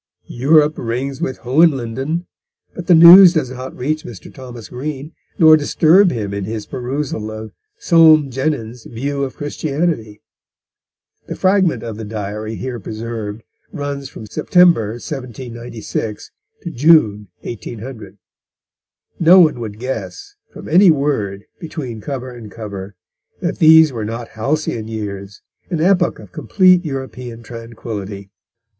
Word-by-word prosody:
Europe 150 +4 +2
rings 130 +3 -4
with 130 - -3
Hohenlinden, 135 +2 +1 0.5
but 175 -2 -8
the 175 - +6
news 175 +2 +10
does 150 -7 -1
not 130 0 -8
reach 155 +5 -2
Mr. 110 -6 -11
Thomas 125 -4 -10
Green, 140 +3 -6 0.3
nor 160 -1 +7
disturb 165 +5 +4
him 105 -8 -4
in 100 -1 -4
his 110 0 -5
perusal 130 -3 -4
of 110 0 -8 0.3
Soame 160 - +5
Jenyns' 125 -4 -3
View 140 +4 -4
of 130 - -5
Christianity. 145 -7 -3 1.0
The - - -5
fragment 185 - +1
of 115 -2 -6
the 110 - -7
Diary 105 +1 -5
here 125 +1 -5
preserved 110 0 -6 0.3
runs 140 -2 -5
from 110 - -10
September 170 - +3
1796 120 -4 -6 0.3
to 170 - -5
June 120 -9 +3
1800. 115 -3 -8 1.0
No 175 +3 +7
one 155 -8 +4
would 110 -3 -6
guess, 110 -7 -6 0.2
from - - -11
any 180 +4 +5
word 120 -10 -1
between 135 -9 -7
cover 130 -1 -6
and 120 -3 -11
cover, 100 -3 -8 0.4
that - - -3
these 160 -2 +6
were 115 -3 -4
not 115 +2 -6
halcyon 115 -1 -3
years, 100 -3 -7 0.3
an 170 - -2
epoch 180 +1 +2
of - - -14
complete 180 - +3
European 130 -5 -7
tranquillity. 110 -4 -8
125 Hz, 130 wpm, -18 LUFS, 110-155 Hz, 1.0 s, news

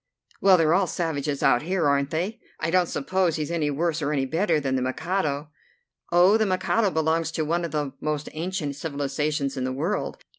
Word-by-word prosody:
"Well, 190 -2 +6
they're 160 -1 +3
all 190 +1 +3
savages 150 -5 -2
out 120 - +4
here, 175 -1 0
aren't 140 0 +2
they? 180 +9 -2 0.2
I 160 0 -1
don't 180 -1 +3
suppose 180 +3 0
he's 155 +1 -3
any 160 -3 0
worse 165 +2 -1
or 150 0 -1
any 135 -3 0
better 165 +3 +1
than 135 -2 -1
the 130 - 0
Mikado." 145 +2 -2 0.6
"Oh, 180 +5 +6
the 220 - +2
Mikado 185 +3 +1
belongs 160 -1 0
to 155 - -1
one 170 +3 0
of 170 - -2
the 145 -2 -2
most 150 -1 -2
ancient 160 -3 -3
civilizations 145 -1 -2
in 130 - -1
the 130 - -1
world. 160 +10 -2
160 Hz, 195 wpm, -25 LUFS, 145-175 Hz, 0.6 s, Well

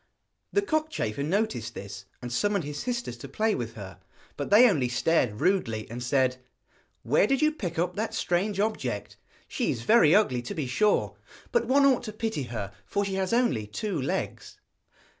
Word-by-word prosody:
The 405 - +2
cockchafer 310 - -1
noticed 145 - -1
this, 100 -1 -8 0.2
and 120 0 -5
summoned 205 +5 +1
his 145 0 -5
sisters 240 - -3
to 130 - -9
play 215 +9 +1
with 115 -2 -4
her; 95 -5 -9 0.4
but - - -4
they 225 +5 +8
only 140 - +1
stared 120 -4 +1
rudely, 115 - +1
and 120 +1 -5
said: 130 0 +1 0.7
'Where 150 - +3
did 270 +2 +2
you 305 - +4
pick 180 - -5
up 180 +2 0
that 220 +2 -2
strange 195 +3 0
object? 135 - -2 0.3
She - - -1
is 115 - -2
very 175 - +6
ugly 130 - +3
to 160 +12 -6
be 155 -5 -2
sure, 210 +12 +1 0.3
but 475 - +1
one 275 +2 +4
ought 265 -2 +4
to 215 - -6
pity 215 - -2
her 110 -5 -5
for 200 0 -1
she 195 - -3
has 190 -1 -1
only 230 - +1
two 175 - -3
legs.' 130 - -3
170 Hz, 180 wpm, -27 LUFS, -, 0.7 s, they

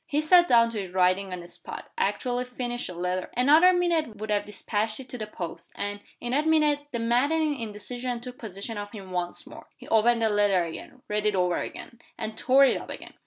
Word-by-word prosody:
He 295 -3 +1
sat 345 +3 +6
down 230 -1 +5
to 215 -3 -3
his 190 - -7
writing 185 +1 +2
on 180 -1 -5
the 175 - -11
spot; - - -8
actually 250 - -1
finished 245 -1 -4
the 180 - -7
letter; 180 +1 -2
another 305 +8 +6
minute 340 -9 +1
would 215 +1 -5
have 205 -1 +1
dispatched 210 +2 -2
it 260 - -9
to 250 - -6
the 215 - -4
post 170 -4 -7
and, 205 0 -4 0.2
in 240 - -4
that 295 +4 +1
minute, 300 -2 +3
the 235 - -2
maddening 285 +7 +2
indecision 235 +3 -4
took 250 +1 -9
possession 205 0 -6
of 205 +1 -7
him 195 -4 -9
once 175 -1 -3
more. - - -12
He - - -13
opened 230 +1 +4
the 220 - +4
letter 205 -3 +3
again, 170 +9 -8
read 210 0 0
it 210 - +2
over 180 -1 +1
again, 235 - -6 0.2
and 215 0 -5
tore 265 +4 +5
it - - +2
up - - -11
again. - - -8
230 Hz, 220 wpm, -26 LUFS, 200-255 Hz, 0.2 s, sat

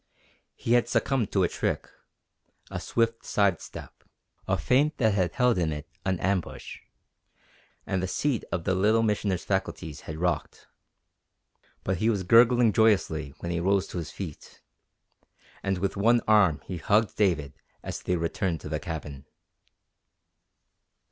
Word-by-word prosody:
He 115 - -1
had 120 -1 +3
succumbed 125 -4 0
to 95 - +2
a - - +4
trick - - -2 0.8
a - - -3
swift 115 0 0
side 100 -4 +1
step, - - -11 0.4
a - - +1
feint 145 +5 +2
that 110 -5 +3
had 90 -4 0
held 125 -6 +2
in 80 -2 0
it 75 0 -6 0.2
an 95 -2 -1
ambush, 95 -1 -2 1.1
and 95 -1 -1
the 95 - -1
seat 130 +5 -1
of 85 - -2
the 95 - +1
Little 110 +4 +3
Missioner's 105 -4 0
faculties 95 -5 -3
had 75 - -5
rocked. 90 +1 -2 1.2
But 95 -1 -1
he 110 +6 +1
was 100 -4 0
gurgling 115 +2 +5
joyously 95 - +2
when 85 - -3
he 85 - -1
rose 95 +2 +2
to 90 - -4
his 80 - -5
feet, 85 -7 -9 1.0
and 95 -1 -1
with 95 +2 -2
one 115 +4 +3
arm 100 -8 +4
he 90 - -5
hugged 105 +6 +2
David 85 -9 +1 0.3
as - - -5
they 90 - 0
returned 85 0 -1
to - - -7
the 75 -1 -2
cabin. 75 -5 -7
95 Hz, 150 wpm, -27 LUFS, 85-110 Hz, 1.2 s, gurgling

